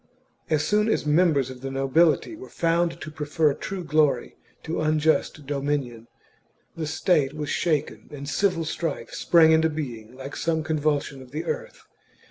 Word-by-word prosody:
As 155 -1 +1
soon 210 +1 +2
as 215 - 0
members 150 -4 +3
of 125 -1 -11
the 135 - -4
nobility 135 - +2
were 385 +5 -11
found 170 0 0
to 155 - -6
prefer 150 0 +1
true 190 +5 -5
glory 155 -2 +1 0.3
to 165 0 -3
unjust 155 -1 +1
dominion, 140 -5 -2 0.7
the 160 -2 -3
state 155 -2 +1
was 150 -1 -4
shaken 155 -4 -1
and 140 -1 -7
civil 170 +2 +1
strife 155 -6 -3
sprang 165 -2 +5
into 160 0 +4
being 125 -7 -6
like 135 +2 -8
some 160 -1 -1
convulsion 150 -3 -1
CHAP, 130 - -12
of - - -22
the 155 - -3
earth. - - -5
155 Hz, 160 wpm, -25 LUFS, 140-165 Hz, 0.7 s, sprang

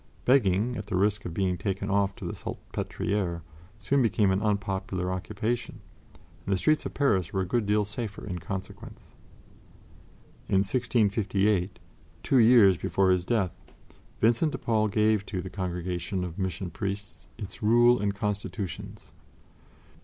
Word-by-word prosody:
Begging, 120 -2 +3
at 105 -1 -6
the 105 - -2
risk 100 +2 +1
of 85 - -4
being 90 -3 0
taken 100 +2 -2
off 100 -1 +1
to - - -8
the - - -3
Salpêtrière, 90 -5 -3 0.4
soon 135 +7 +1
became 105 -4 +3
an 95 +2 +1
unpopular 95 -3 -1
occupation, 110 +5 -3 0.6
and 100 - -4
the 95 - +3
streets 155 +11 +2
of - - -11
Paris 95 - +1
were 95 - 0
a - - -1
good 115 +2 0
deal 105 0 +2
safer 105 0 -6
in 90 -4 -4
consequence. 100 +5 -8 1.4
In 95 0 +3
1658, 105 -4 +1 0.5
two 135 - +3
years 110 -6 +7
before 95 +1 +2
his 90 -1 +1
death, 100 -4 0 0.7
Vincent 120 +7 +3
de - - -2
Paul 110 -2 +1
gave 105 0 +2
to 95 - -3
the 95 +1 -6
Congregation 90 0 -3
of 90 +1 -6
Mission 95 -1 -3
Priests 100 -6 -5
its 105 +3 -8
Rule 120 +3 +5
and 100 -1 -1
Constitutions. 100 -2 -5
100 Hz, 145 wpm, -27 LUFS, 95-110 Hz, 1.4 s, years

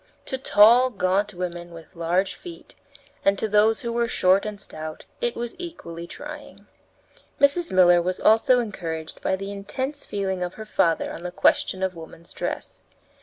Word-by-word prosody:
To 265 - -3
tall, 235 +2 +6
gaunt 200 -1 0
women 175 -2 -5
with 165 +2 -13
large 175 +3 0
feet 170 -1 -12 0.5
and 195 0 +3
to 220 - -1
those 215 +1 +3
who 235 -1 -3
were 235 0 +1
short 190 0 +3
and 210 -1 -6
stout, 155 -5 -8 0.2
it 240 0 -1
was 235 0 -4
equally 170 - -7
trying. 295 - -10 0.7
Mrs. 285 +5 +3
Miller 175 -2 +6
was 180 +1 -2
also 225 +4 +5
encouraged 170 -9 -4
by 190 - +1
the 195 +1 -6
intense 260 +9 -4
feeling 190 -2 -3
of 180 0 -3
her 220 - -8
father 165 -6 +1
on - - -8
the 180 - -4
question 185 +1 +2
of 190 -1 -1
woman's 165 +1 -12
dress. - - -5
195 Hz, 170 wpm, -24 LUFS, 175-230 Hz, 0.7 s, tall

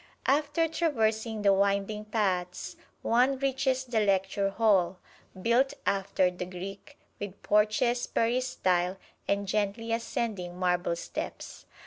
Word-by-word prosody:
After 295 +4 +2
traversing 225 -9 0
the 200 -1 +6
winding 200 +2 +1
paths, 185 -5 -1 0.3
one 255 +4 +3
reaches 265 -1 0
the 240 -3 0
lecture 195 -1 +1
hall, 195 -4 +2 0.4
built 240 +7 +2
after 190 -2 +1
the 180 0 -6
Greek, 195 +9 -8 0.2
with 200 -1 -6
porches, 220 +4 +2
peristyle 210 -7 +1 0.3
and 200 0 0
gently 210 +3 -1
ascending 210 -6 -3
marble 180 -1 +1
steps. 170 - -6
210 Hz, 110 wpm, -29 LUFS, 190-240 Hz, 0.4 s, the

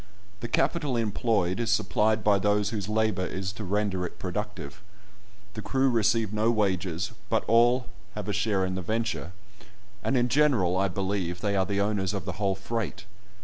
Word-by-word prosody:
The 120 - -4
capital 140 0 +1
employed 105 -4 0
is 115 - -1
supplied 110 +2 +2
by 100 -1 +4
those 105 +1 +1
whose 105 -3 -3
labour 110 -4 +1
is 95 0 -4
to 105 +2 -7
render 100 -1 -1
it 90 - -6
productive. 95 -4 -5 0.7
The 110 - -6
crew 135 +3 +1
receive 110 -2 +2
no 110 +2 +2
wages, 95 -5 0 0.2
but - - +1
have - - -9
all 120 +2 +4 0.3
a 105 -1 -3
share 100 -2 +1
in 95 - -2
the 95 - -3
venture, 110 -2 -2 0.7
and 135 - +1
in 120 0 +3
general, 125 -10 +3
I 95 +1 +2
believe, 95 -2 -2
they 100 -2 0
are 95 -1 +1
the 100 0 0
owners 100 -1 0
of 95 - -4
the 95 +2 -5
whole 100 -1 +2
freight. 105 +1 -4
105 Hz, 180 wpm, -27 LUFS, 95-115 Hz, 0.7 s, by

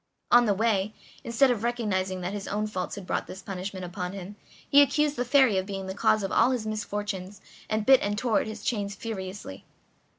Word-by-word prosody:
On 240 -1 +7
the 205 - +3
way, 215 -1 +1 0.3
instead 240 +3 +3
of 225 -3 -2
recognizing 195 -6 -1
that 180 +2 -3
his 205 -1 -5
own 210 +1 -1
faults 185 -4 -4
had 200 -2 -8
brought - - -2
this 190 0 -9
punishment 190 -1 -5
upon 180 0 -5
him, 195 +1 -8 0.3
he 285 - +7
accused 295 +1 +2
the 245 - 0
Fairy 250 -6 +4
of 190 - -5
being 195 -1 -4
the 190 - -4
cause 210 +1 +2
of 195 - -2
all - - +4
his 250 -4 -1
misfortunes, 205 -2 -4 0.3
and 215 -1 0
bit 265 +1 +7
and 205 0 -1
tore 230 0 +2
at - - -5
his 220 -1 -7
chains 205 -4 -2
furiously. 190 - -6
205 Hz, 210 wpm, -27 LUFS, 190-230 Hz, 0.3 s, On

